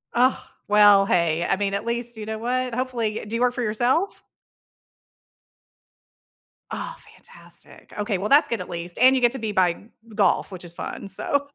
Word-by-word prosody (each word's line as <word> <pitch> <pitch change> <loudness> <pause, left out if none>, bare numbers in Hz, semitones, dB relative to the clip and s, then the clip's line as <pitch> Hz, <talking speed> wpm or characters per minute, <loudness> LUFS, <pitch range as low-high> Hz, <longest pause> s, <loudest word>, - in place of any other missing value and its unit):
Ugh, 255 +2 +4 0.3
well, 205 -1 +6
hey, 170 -2 +1
I - - +3
mean, 200 0 -2
at 200 - -2
least, 235 0 -3
you 215 - -6
know 220 0 -4
what? 250 +1 -1
Hopefully 235 -4 -2
Uh, - - -9
do 220 +2 -5
you 235 - -1
work 245 0 +3
for 250 - -3
yourself? 245 - 0 2.5
Oh, - - -5 0.2
fantastic. - - -12
Okay. 205 -2 -1
Well, 205 +3 -3
that's 290 +3 +5
good 230 - -1
at 180 - -7
least. 170 0 -5
And 260 +2 +6
you 260 - +1
get 240 -1 +4
to 265 - -5
be 220 -2 -3
by 180 -2 +1 0.3
golf, 200 0 +2
which 180 -1 -8
is 170 - -7
fun. 185 - -6
So, 285 +9 -1
220 Hz, 185 wpm, -24 LUFS, 195-245 Hz, 2.5 s, well